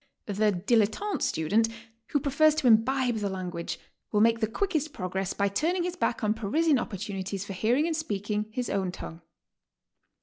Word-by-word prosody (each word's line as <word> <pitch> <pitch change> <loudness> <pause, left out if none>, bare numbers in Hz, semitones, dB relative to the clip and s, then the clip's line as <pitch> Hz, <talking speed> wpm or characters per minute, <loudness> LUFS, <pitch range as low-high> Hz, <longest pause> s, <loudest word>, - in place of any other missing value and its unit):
The 205 - -4 0.2
dilettante 220 - +1
student 210 +8 +2 0.4
who 290 - +1
prefers 295 +3 +3
to 310 -3 -2
imbibe 245 +1 +4
the 205 -2 -1
lan 185 -2 -4
guage, 170 -1 -4 0.3
will 210 - +2
make 230 +1 +4
the 220 - +1
quickest 310 - -1
progress 190 -3 -3
by 200 - +2
turning 330 - 0
his 355 0 -2
back 240 -10 -1
on 210 0 +3
Parisian 270 +7 +2
opportunities 195 -2 -4
for 195 - -6
hearing 235 - +2
and 330 -1 0
speaking 210 -7 -2
his 245 +1 -2
own 190 -2 -1
tongue. 170 -2 -8
220 Hz, 170 wpm, -28 LUFS, 195-285 Hz, 0.4 s, imbibe